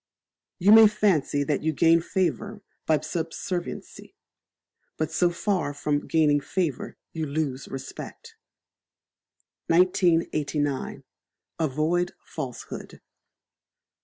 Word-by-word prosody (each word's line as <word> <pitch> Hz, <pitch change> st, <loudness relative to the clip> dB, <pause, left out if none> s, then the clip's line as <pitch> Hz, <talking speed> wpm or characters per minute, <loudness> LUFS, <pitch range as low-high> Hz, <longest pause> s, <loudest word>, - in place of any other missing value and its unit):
You 195 Hz, +2 st, +4 dB
may 220 Hz, 0 st, +10 dB
fancy 190 Hz, -9 st, +1 dB
that 145 Hz, 0 st, -1 dB
you 160 Hz, +1 st, 0 dB
gain 165 Hz, +2 st, +4 dB
favour 200 Hz, +4 st, -2 dB, 0.2 s
by 155 Hz, -3 st, +3 dB
subserviency; 170 Hz, +2 st, -5 dB, 0.8 s
but 155 Hz, 0 st, -2 dB
so 175 Hz, +2 st, +2 dB
far 175 Hz, -4 st, -1 dB
from 145 Hz, 0 st, -1 dB
gaining 150 Hz, -2 st, +3 dB
favour, 165 Hz, -4 st, -3 dB, 0.2 s
you 160 Hz, -2 st, -3 dB
lose 140 Hz, -2 st, -2 dB
respect. 135 Hz, 0 st, -8 dB, 1.3 s
1989. 165 Hz, -5 st, +1 dB, 0.6 s
Avoid 160 Hz, +4 st, 0 dB
Falsehood. 135 Hz, -6 st, -7 dB
160 Hz, 90 wpm, -26 LUFS, 145-180 Hz, 1.3 s, may